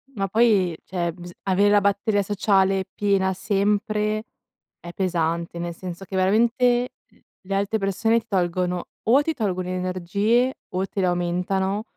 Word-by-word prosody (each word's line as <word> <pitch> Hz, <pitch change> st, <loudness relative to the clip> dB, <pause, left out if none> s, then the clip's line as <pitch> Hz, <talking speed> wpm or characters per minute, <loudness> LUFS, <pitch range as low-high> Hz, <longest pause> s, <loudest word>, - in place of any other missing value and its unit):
Ma 195 Hz, -1 st, -1 dB
poi 200 Hz, -5 st, +3 dB
cioè 175 Hz, -2 st, -2 dB
biz 175 Hz, +1 st, -11 dB
avere 200 Hz, +1 st, +3 dB
la 205 Hz, 0 st, +5 dB
batteria 200 Hz, +1 st, +1 dB
sociale 195 Hz, -1 st, +2 dB
piena 195 Hz, -2 st, +1 dB
sempre 210 Hz, +2 st, 0 dB, 0.6 s
è 170 Hz, -, -9 dB
pesante, 170 Hz, -2 st, -1 dB
nel 170 Hz, 0 st, -4 dB
senso 180 Hz, +1 st, -7 dB
che 190 Hz, -, -7 dB
veramente 235 Hz, +6 st, +2 dB, 0.2 s
l -, -, -27 dB, 0.3 s
le 195 Hz, -, -1 dB
altre 200 Hz, +3 st, 0 dB
persone 225 Hz, +4 st, +1 dB
ti 225 Hz, -, -17 dB
tolgono 180 Hz, -2 st, -1 dB, 0.2 s
o 255 Hz, +6 st, +5 dB
ti 320 Hz, +2 st, -1 dB
tolgono 185 Hz, -, -2 dB
energie 185 Hz, +7 st, 0 dB, 0.2 s
o 185 Hz, +1 st, -1 dB
te -, -, -5 dB
le 190 Hz, -, +2 dB
aumentano, 180 Hz, +3 st, -1 dB
195 Hz, 150 wpm, -23 LUFS, 180-210 Hz, 0.6 s, la